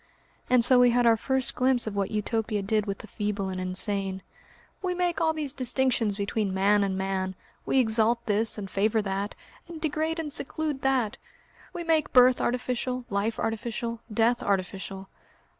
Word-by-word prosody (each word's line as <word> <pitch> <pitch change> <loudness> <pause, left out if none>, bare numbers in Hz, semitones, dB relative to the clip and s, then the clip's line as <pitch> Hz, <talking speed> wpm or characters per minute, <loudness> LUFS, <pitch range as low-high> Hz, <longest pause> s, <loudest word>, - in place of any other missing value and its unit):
And 250 -2 +5
so 250 0 +6
we 245 0 +6
had 245 0 +2
our 230 -1 +6
first 265 +3 0
glimpse 255 -1 +1
of 215 -2 -4
what 200 -1 -1
Utopia 215 0 -2
did 210 +1 0
with 195 -1 -2
the - - -10
feeble 205 -2 -3
and 185 -1 -4
insane. 190 +1 0 0.6
"We 360 -1 -1
make 355 -1 0
all 320 - +3
these 300 -4 -3
distinctions 255 -5 0
between 200 -1 -1
man 200 +2 +3
and 190 -1 -1
man, 190 -1 -2 0.3
we - - +1
exalt 230 -1 +2
this 220 0 +2
and 200 -2 -5
favour 210 +3 +1
that, 195 +1 -3 0.3
and 335 -2 -8
degrade 315 +1 -1
and 305 -3 -4
seclude 305 -3 -3
that; 260 -5 0 0.5
we 345 - -5
make 320 -3 +1
birth 250 0 +6
artificial, 250 0 -2
life 205 +3 -1
artificial, 230 +1 -3
death 230 +3 +2
artificial." 195 0 -3
225 Hz, 170 wpm, -27 LUFS, 200-255 Hz, 0.6 s, so